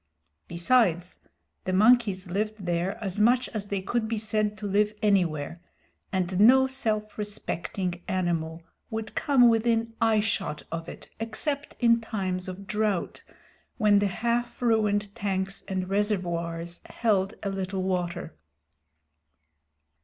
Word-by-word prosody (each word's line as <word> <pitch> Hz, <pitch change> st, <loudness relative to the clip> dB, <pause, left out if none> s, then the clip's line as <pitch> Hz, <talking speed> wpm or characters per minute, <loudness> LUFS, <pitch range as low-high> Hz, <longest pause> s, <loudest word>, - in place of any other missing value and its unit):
Besides, 175 Hz, -1 st, +2 dB, 0.5 s
the 185 Hz, -, -1 dB
monkeys 210 Hz, -2 st, +4 dB
lived 205 Hz, +2 st, -3 dB
there 175 Hz, +2 st, -1 dB
as 195 Hz, 0 st, -3 dB
much 245 Hz, +4 st, +4 dB
as 210 Hz, -2 st, -5 dB
they 200 Hz, -2 st, -2 dB
could 230 Hz, +2 st, -1 dB
be 225 Hz, 0 st, -1 dB
said 215 Hz, -1 st, -1 dB
to 210 Hz, -, -7 dB
live 210 Hz, +1 st, +1 dB
anywhere, 175 Hz, -5 st, +1 dB, 0.5 s
and 185 Hz, -1 st, -1 dB
no 260 Hz, +5 st, +7 dB
self 215 Hz, -5 st, -2 dB
respecting 185 Hz, -3 st, -4 dB
animal 170 Hz, -3 st, -1 dB, 0.3 s
would 220 Hz, -1 st, -4 dB
come 265 Hz, -4 st, +4 dB
within 230 Hz, 0 st, +2 dB
eyeshot 210 Hz, -7 st, +1 dB
of 165 Hz, 0 st, -4 dB
it -, -, -10 dB
except 280 Hz, +6 st, -3 dB
in 235 Hz, -1 st, +4 dB
times 190 Hz, -5 st, -3 dB
of 185 Hz, +2 st, -7 dB
drought, 210 Hz, -2 st, -1 dB, 0.6 s
when 210 Hz, -3 st, +5 dB
the 205 Hz, -, +2 dB
half 235 Hz, +5 st, -1 dB
ruined 210 Hz, -3 st, +2 dB
tanks 195 Hz, -3 st, -2 dB
and 185 Hz, -1 st, -2 dB
reservoirs 175 Hz, -4 st, -2 dB
held 205 Hz, -3 st, 0 dB
a 200 Hz, -, -1 dB
little 190 Hz, -1 st, -3 dB
water. 180 Hz, -3 st, -2 dB
205 Hz, 125 wpm, -27 LUFS, 185-220 Hz, 0.6 s, no